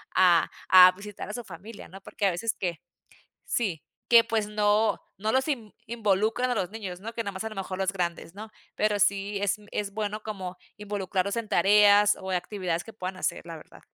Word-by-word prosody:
a 180 -2 +5 0.2
a 185 0 +9
visitar 200 +2 -9
a 210 - -5
su 240 - -5
familia, 195 +5 -11
¿no? 195 +2 -12
Porque, 200 - -4
a - - +2
veces 215 +6 -2
que 175 -4 -4 0.6
sí, 190 -10 -2 0.2
que 235 -1 +7
pues, 220 -2 -1
no 210 +1 +2 0.2
no 215 +3 -1
los 265 +2 +2
inv 230 -8 -3
involucran 220 +2 0
a - - +1
los 185 -3 -1
niños, 195 -5 -7
¿no? 225 +3 -7
Que 230 - -2
nada 200 - -5
más, 190 +2 -6
a 220 - -2
lo - - -9
mejor 190 -1 -5
los 190 0 0
grandes, 175 -2 -4
¿no? 215 +2 -8 0.3
Pero 210 -1 +1
sí, 200 0 +1
es 205 0 +1 0.2
es 200 -1 -3
bueno, 215 0 -3
como 190 -4 -6 0.2
involucrarlos 200 -1 -2
en 225 -2 -3
tareas 205 +2 +5
o 190 - -6
actividades, 180 -2 -2
que 225 - -11
puedan 185 -2 -5
hacer - - -2
la 165 - -7
verdad. 155 - -16
205 Hz, 205 wpm, -27 LUFS, 185-215 Hz, 0.6 s, a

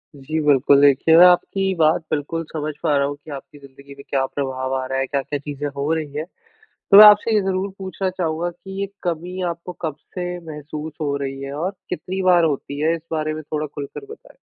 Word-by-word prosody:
जी 155 +3 -4
बिल्कुल, 140 0 +5
देखिए 145 +3 +5
मैं 180 - +10
आपकी 190 +2 +3
बात 155 +1 +4
बिल्कुल 155 +2 -2
समझ 155 -1 -3
पा 150 -3 +2
रहा 140 0 +2
हूँ 145 - -4
कि 145 +1 -14
आपकी 140 +1 -9
ज़िंदगी 140 0 -14
में 140 - -12
क्या 135 -1 +1
प्रभाव 130 -1 -3
आ 130 0 -2
रहा 135 0 -2
है, 135 - 0
क्या-क्या 140 +1 -2
चीज़ें 145 0 -5
हो 145 +3 0
रही 155 -3 -3
है। 150 +1 -3 0.5
तो 200 - +3
मैं 215 - +12
आपसे 210 +2 +6
ये 210 - +4
ज़रूर 190 +1 -1
पूछना 190 0 -3
चाहूँगा 175 -2 -2
कि 190 +3 -10
ये 200 - -1 0.2
कमी 180 +2 -3
आपको 170 +1 -7
कब 155 -3 -3 0.2
से 180 0 -3
महसूस 150 +1 -7
हो 140 -1 0
रही 135 -1 -5
है 140 0 -6
और 170 +6 -2 0.2
कितनी 185 +1 -4
बार 180 -2 +4
होती 145 -1 -2
है, 160 +2 +2
इस 165 - -9
बारे 155 -1 -1
में 155 - -5
थोड़ा 155 +1 -3
खुलकर 145 - -8
बताएँ? 460 +2 -13
155 Hz, 220 wpm, -21 LUFS, 140-180 Hz, 0.5 s, मैं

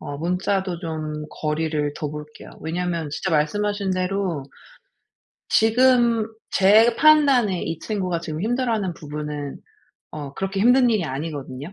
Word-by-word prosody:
어 145 - -6
문자도 180 +2 -1
좀 155 -3 -4
거리를 150 -1 -2
둬 150 - -4
볼게요. 150 0 -10
왜냐하면 170 -1 -2
진짜 185 +6 -3
말씀하신 200 +6 0
대로 185 -4 -1 1.1
지금 235 0 +4 0.3
제 220 +5 +5
판단에 275 - +4
이 165 -1 -4
친구가 185 -5 -2
지금 160 -1 -5
힘들어하는 225 -4 0
부분은 150 -2 -6 0.5
어 145 -3 -7
그렇게 195 0 -2
힘든 245 +3 +5
일이 215 -6 +1
아니거든요? 145 +1 -5
180 Hz, 290 characters per minute, -23 LUFS, 150-210 Hz, 1.1 s, 제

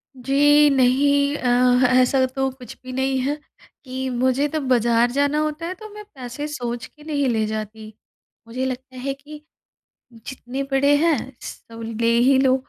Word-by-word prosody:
जी, 290 +3 +4
नहीं। 280 +2 +3
अ, 255 - -3 0.5
ऐसा 260 +1 +3
तो 265 +1 -2
कुछ 250 -2 -11
भी 255 - -8
नहीं 265 +1 0
है 280 +3 -1 0.5
कि 260 0 -4
मुझे 260 +3 +1
तो 310 +1 -3
बाज़ार 240 -1 +3
जाना 285 +3 +1
होता 305 +2 -3
है 365 - -4
तो 435 +1 -11
मैं 420 0 -9
पैसे 255 +3 -6
सोच 245 -5 -5
के 300 - -18
नहीं 290 -3 -1
ले 220 -2 +1
जाती। 215 0 -6 0.5
मुझे 255 +3 -3
लगता 260 0 -6
है 270 +2 -3
कि 295 +2 -12 0.7
जितने 250 +3 -6
बड़े 280 +2 +4
हैं 330 -4 +3 0.2
सब 230 0 -10 0.2
ले 230 - +2
ही 260 +3 +4
लो। 260 -1 +4
265 Hz, 165 wpm, -22 LUFS, 245-285 Hz, 0.7 s, जी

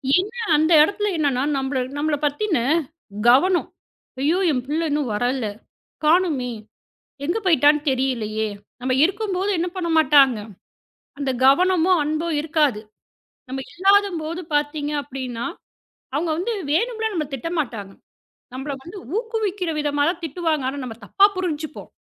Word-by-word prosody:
ஏன்னா, 420 +6 -1 0.2
அந்த 315 +3 +2
இடத்துல 415 +4 0
என்னன்னா 275 -4 +1
நம்மள 265 0 -1 0.2
நம்மளப் 295 0 -1
பத்தின 330 +4 0 0.7
கவனம். 350 +8 +4 0.5
"ஐயோ, 320 +6 +2
என் 250 -3 -1
பிள்ளை 320 +3 -1
இன்னும் 290 -5 0
வரல! 245 +1 0 0.6
காணுமே, 310 -7 +2 0.8
எங்க 345 +8 0
போயிட்டான்னு 300 -4 +4
தெரியலையே!" 220 -5 -1 0.3
நம்ம 255 0 0
இருக்கும்போது 390 +1 0
என்ன 350 +1 -1
பண்ணமாட்டாங்க, 300 -7 +4 0.8
அந்த 275 -2 0
கவனமும், 360 +4 +4
அன்பும் 310 +1 -1
இருக்காது. 300 -8 +1 0.7
நம்ம 265 +1 -4
இல்லாதம்போது 365 -3 +2
பாத்தீங்க 290 0 -1
அப்படின்னா, 255 -4 -5 0.7
அவங்க 320 +3 0
வந்து 450 +6 -1 0.2
வேணும்னுலாம் 445 +3 0
நம்மள 305 -4 -2
திட்டமாட்டாங்க. 245 - -4 0.6
நம்மள 275 +2 -4
வந்து 380 +4 -9 0.2
ஊக்குவிக்கிற 420 -6 -2
விதமாத்தான் 295 +4 0
திட்டுவாங்க. 315 -3 -1
ஆனா 285 - -7
நாம 230 -3 -6
தப்பா 390 - +4
புரிஞ்சுப்போம். 310 -4 -4
310 Hz, 115 wpm, -22 LUFS, 270-360 Hz, 0.8 s, கவனம்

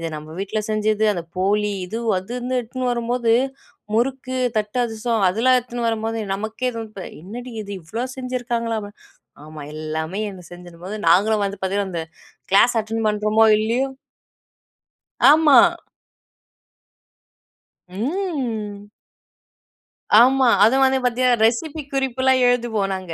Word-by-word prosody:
இது 165 - -3
நம்ம 155 +1 -10
வீட்ல 215 +2 -2
செஞ்சது, 215 0 +1
அந்த 170 -3 -5
போலி 205 +2 +1
இது, 225 +5 -5 0.2
அதுன்னு 245 +6 -3
எடுத்துட்னு 250 +2 -3
வரும்போது 235 0 0 0.6
முறுக்கு, 260 +2 -1 0.2
தட்டு 210 +3 -3
அதிரசம் 225 -2 -1
அதெல்லாம் 250 +6 +3
எடுத்துன்னு 240 -1 -4
வரும்போது 225 0 -2
நமக்கே 220 +5 -3 0.5
என்னடி 240 +6 -8
இது? 200 0 -8
இவ்ளோ 225 +10 -4
செஞ்சுருக்காங்களாப்ப! 235 -4 -3 0.6
ஆமா, 155 -1 -10 0.2
எல்லாமே 160 +5 -4
அந்த 180 -2 -12
செஞ்சிரும்போது, 175 +3 -9
நாங்களும் 205 +4 +3
வந்து 200 0 -6
பார்த்தீங்கன்னா, 195 0 -1
அந்த 165 -1 -3 0.5
கிளாஸ் 235 +4 +5
அட்டென் 225 0 -3
பண்ணுறமோ! 215 +1 +3
இல்லயோ! 245 +5 0 1.4
ஆமா. 300 -3 +6 2.3
ம். 225 - -4 1.3
ஆமா. 260 +2 +5 0.2
அதுவும் 265 +4 +4
வந்து 265 0 +3
பார்த்தீங்கன்னா, 245 -1 +2
ரெசிபி 295 +6 -2
குறிப்புலாம் 260 -1 +1
எழுதுவோம் 230 -5 0
நாங்க. 185 -3 -6
225 Hz, 110 wpm, -21 LUFS, 205-250 Hz, 2.3 s, ஆமா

